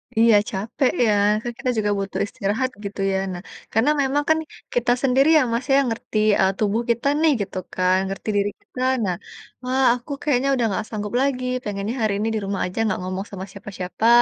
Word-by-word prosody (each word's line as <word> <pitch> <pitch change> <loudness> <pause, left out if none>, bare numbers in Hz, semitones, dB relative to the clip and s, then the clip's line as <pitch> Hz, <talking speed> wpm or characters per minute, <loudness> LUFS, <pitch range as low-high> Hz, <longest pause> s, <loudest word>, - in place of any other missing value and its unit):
Iya, 225 -1 +6
capek 225 +7 0
ya, 215 - +3 0.3
kan 240 +1 -4
kita 255 - -1
juga 210 -1 +1
butuh 195 0 -3
istirahat 210 +7 -1 0.2
gitu 200 0 -6
ya. 190 - +1 0.2
Nah, 175 - -6 0.3
karena 225 +7 +3
memang 280 +2 +1
kan 315 - +5 0.4
kita 245 0 +2
sendiri 270 +2 +4
ya, - - +5
Mas, 235 +2 -1
ya, 270 - +4
yang 265 -3 +1
ngerti, 225 -1 -4 0.2
eee, 190 0 +4
tubuh 215 +2 +1
kita 235 +4 -1
nih, 320 -2 +5
gitu 195 -1 -4 0.2
kan, 185 0 +2
ngerti 195 +3 -5
diri 200 0 +2
kita. 255 - -9 0.2
Nah, 180 -2 0 0.5
"Wah 260 +1 +1
aku 250 +4 -10
kayaknya 275 -2 +1
udah 240 -2 +1
nggak 205 +2 -1
sanggup 210 -1 -4
lagi, 260 -2 0 0.2
pengennya 205 +3 -3
hari 215 -2 +2
ini 220 - 0
di 215 - 0
rumah 195 0 -2
aja 180 - -7
nggak 200 -4 0
ngomong 185 +2 -3
sama 190 -1 -6
siapa-siapa," 200 +2 -3
220 Hz, 205 wpm, -22 LUFS, 195-250 Hz, 0.5 s, Iya